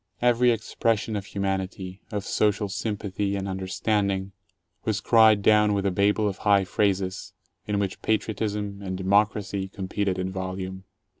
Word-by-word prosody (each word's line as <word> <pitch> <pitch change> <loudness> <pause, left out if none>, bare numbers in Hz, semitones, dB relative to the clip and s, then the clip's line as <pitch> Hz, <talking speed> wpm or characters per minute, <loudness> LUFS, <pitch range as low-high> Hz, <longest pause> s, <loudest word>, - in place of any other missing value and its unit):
Every 120 0 +4
expression 115 -1 0
of 100 -1 -4
humanity, 95 -1 -3
of 100 -1 -3
social 105 -1 +1
sympathy, 100 0 -2
and 100 0 -3
understanding 95 +1 -1 0.5
was 110 -1 0
cried 110 -3 +5
down 105 0 +5
with 100 -1 -1
a 100 - +2
Babel 105 +3 +2
of 95 -2 -4
high 100 -2 +4
phrases, 95 -1 -1 0.3
in 105 -1 0
which 100 -2 -2
"patriotism" 105 -2 -1
and 95 -1 -4
"democ 100 +3 +3
racy" 100 -2 -4
competed 95 0 -2
in 95 0 -2
volume. 95 0 -5
100 Hz, 145 wpm, -26 LUFS, 95-105 Hz, 0.5 s, cried